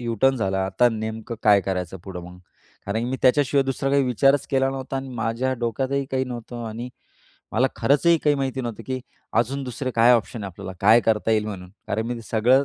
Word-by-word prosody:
U 120 Hz, -1 st, -2 dB
turn 135 Hz, 0 st, +5 dB
झाला 95 Hz, -3 st, 0 dB
आता 120 Hz, +5 st, +3 dB
नेमकं 110 Hz, +1 st, -5 dB
काय 105 Hz, -2 st, +6 dB
करायचं 95 Hz, -2 st, -3 dB
पुढं 95 Hz, -2 st, -6 dB
मग? 90 Hz, 0 st, -12 dB, 0.5 s
कारण 100 Hz, +3 st, -1 dB
की 125 Hz, -, -3 dB
मी 130 Hz, -, -1 dB
त्याच्याशिवाय 140 Hz, +1 st, +4 dB
दुसरा 135 Hz, +1 st, -1 dB
काही 140 Hz, 0 st, +4 dB
विचारच 135 Hz, +3 st, +3 dB
केला 135 Hz, -1 st, +2 dB
नव्हता 135 Hz, 0 st, -4 dB
आणि 135 Hz, 0 st, -4 dB
माझ्या 115 Hz, +3 st, -1 dB
डोक्यातही 135 Hz, +4 st, -1 dB
काही 130 Hz, 0 st, 0 dB
नव्हतं 120 Hz, -1 st, -7 dB
आणि 115 Hz, +3 st, -6 dB, 0.6 s
मला 125 Hz, +4 st, +3 dB
खरंचही 145 Hz, +7 st, +3 dB
काही 145 Hz, -1 st, +4 dB
माहिती 135 Hz, -1 st, -2 dB
नव्हतं, 115 Hz, -2 st, -5 dB
की 130 Hz, -1 st, -3 dB, 0.3 s
अजून 135 Hz, +4 st, 0 dB
दुसरे 130 Hz, +1 st, -4 dB
काय 115 Hz, +2 st, +6 dB
ऑप्शन 115 Hz, -2 st, 0 dB
आहे? -, -, -3 dB
आपल्याला 95 Hz, -, -8 dB
काय 110 Hz, +4 st, +6 dB
करता 110 Hz, -1 st, +1 dB
येईल? 110 Hz, -1 st, +2 dB
म्हणून 90 Hz, -4 st, -7 dB, 0.2 s
कारण 110 Hz, +3 st, -1 dB
मी 120 Hz, -, -2 dB
ते 115 Hz, -, -8 dB
सगळं 125 Hz, +5 st, +4 dB
120 Hz, 210 wpm, -23 LUFS, 110-135 Hz, 0.6 s, काय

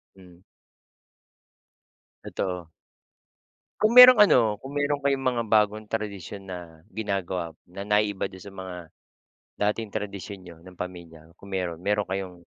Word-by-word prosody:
Hmm. 90 Hz, -1 st, -18 dB, 1.8 s
Totoo. 90 Hz, -4 st, -4 dB, 1.1 s
Kung 215 Hz, +2 st, +3 dB
merong 250 Hz, -2 st, +11 dB
ano, 200 Hz, -11 st, +7 dB, 0.2 s
kung 135 Hz, +2 st, -9 dB
meron 145 Hz, 0 st, 0 dB
kayong 135 Hz, -1 st, 0 dB
mga 120 Hz, -2 st, -2 dB
bagong 105 Hz, 0 st, +2 dB
tradisyon 100 Hz, -2 st, -5 dB
na 85 Hz, -3 st, -10 dB
ginagawa 95 Hz, -6 st, -3 dB
na 90 Hz, +3 st, -9 dB
naiiba 105 Hz, -1 st, 0 dB
do'n 95 Hz, -1 st, -13 dB
sa 100 Hz, -, -10 dB
mga, 95 Hz, -1 st, -7 dB, 0.9 s
dating 105 Hz, +1 st, -1 dB
tradisyon 100 Hz, -1 st, -5 dB
niyo 85 Hz, -2 st, -12 dB
ng 90 Hz, +2 st, -15 dB
pamilya, 85 Hz, -3 st, -9 dB
kung 100 Hz, -, -13 dB
meron. 90 Hz, -3 st, -2 dB
Meron 105 Hz, +1 st, -1 dB
kayong 95 Hz, -1 st, -4 dB
100 Hz, 130 wpm, -26 LUFS, 90-110 Hz, 1.8 s, merong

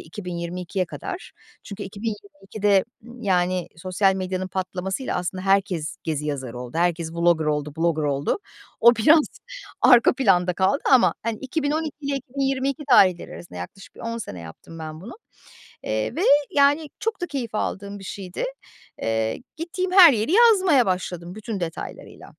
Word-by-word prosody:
2022'ye 180 Hz, +1 st, -4 dB
kadar. 375 Hz, -, -7 dB, 0.3 s
Çünkü 200 Hz, -, -8 dB
2022'de, 200 Hz, -1 st, -1 dB, 0.2 s
ımm, 240 Hz, +1 st, -12 dB
yani 180 Hz, -2 st, +1 dB
sosyal 185 Hz, +3 st, +1 dB
medyanın 185 Hz, 0 st, -3 dB
patlamasıyla 190 Hz, +5 st, -3 dB
aslında 180 Hz, +1 st, -3 dB
herkes 195 Hz, -5 st, +1 dB
gezi 150 Hz, -2 st, -2 dB
yazarı 130 Hz, -5 st, -4 dB
oldu. 125 Hz, +3 st, -7 dB
Herkes 170 Hz, -2 st, 0 dB
Vlogger 170 Hz, -1 st, +2 dB
oldu, 150 Hz, -1 st, -1 dB
Blogger 165 Hz, -2 st, +1 dB
oldu. 140 Hz, -, 0 dB, 0.4 s
O 235 Hz, 0 st, +7 dB
biraz 300 Hz, +7 st, +5 dB, 0.6 s
arka 245 Hz, -2 st, +7 dB
planda 180 Hz, -9 st, +2 dB
kaldı 190 Hz, +8 st, +1 dB
ama, 255 Hz, -, +5 dB
hani, 230 Hz, -1 st, -3 dB
2012 300 Hz, +2 st, -2 dB
ile 280 Hz, -1 st, -2 dB
2022 275 Hz, +1 st, -2 dB
tarihleri 185 Hz, -7 st, +5 dB
arasında 170 Hz, -, -10 dB
yaklaşık 90 Hz, -, -10 dB
bir -, -, -13 dB
10 230 Hz, 0 st, -4 dB
sene 90 Hz, -, -7 dB
yaptım 85 Hz, -, -11 dB
ben 155 Hz, 0 st, -7 dB
bunu. 215 Hz, -, -9 dB, 0.7 s
Eee, 110 Hz, 0 st, -2 dB
ve -, -, -1 dB, 0.3 s
yani 290 Hz, +2 st, +3 dB
çok 450 Hz, -4 st, -2 dB
da 355 Hz, -, -2 dB
keyif 255 Hz, -9 st, -5 dB
aldığım 200 Hz, -1 st, -3 dB
bir 195 Hz, -, -11 dB
şeydi. 185 Hz, -, -5 dB, 0.6 s
Eee, 110 Hz, -, -1 dB
gittiğim 365 Hz, +3 st, -3 dB
her 355 Hz, -6 st, +9 dB
yeri 220 Hz, +7 st, -1 dB
yazmaya 380 Hz, -, +5 dB
başladım 180 Hz, -1 st, -3 dB
bütün 215 Hz, -2 st, -5 dB
detaylarıyla. 165 Hz, -2 st, -7 dB
195 Hz, 145 wpm, -23 LUFS, 170-255 Hz, 0.7 s, her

